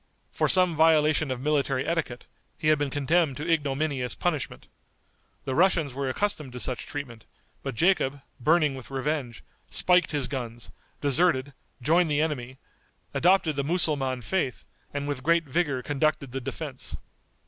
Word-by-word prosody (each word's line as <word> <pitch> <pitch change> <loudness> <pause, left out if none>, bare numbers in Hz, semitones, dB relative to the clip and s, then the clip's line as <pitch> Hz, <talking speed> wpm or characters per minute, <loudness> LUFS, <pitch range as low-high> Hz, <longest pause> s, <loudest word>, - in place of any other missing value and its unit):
For - - +1
some 180 -3 +4
violation 155 -1 +4
of 130 -1 -2
military 140 -2 0
etiquette, 165 -7 -2 0.3
he 155 - +1
had 155 -2 +4
been 145 -1 0
condemned 145 +1 +1
to 150 - -5
ignominious 145 -4 0
punishment. 155 -7 -3 0.8
The 130 - -2
Russians 165 -4 +2
were 135 0 -2
accustomed 150 -4 -2
to 125 - -6
such 125 +1 -3
treatment, 125 -6 -7 0.4
but 135 -3 -5
Jacob, 145 - +2 0.2
burning 150 +2 +3
with 130 -2 -9
revenge, 135 -3 -3 0.3
spiked 180 0 +4
his 145 -4 -1
guns, 120 -4 -6 0.3
deserted, 145 -1 +2 0.3
joined 165 +4 +3
the 145 -1 +1
enemy, 130 -5 -2 0.6
adopted 175 -3 +3
the 140 - -1
Mussulman 140 -6 +1
faith, 140 -4 -2 0.3
and 145 0 -3
with 145 -3 -3
great 170 +4 +3
vigor 140 -3 -1
conducted 145 -2 0
the 135 +1 -4
defense. - - -5
145 Hz, 150 wpm, -27 LUFS, 130-160 Hz, 0.8 s, some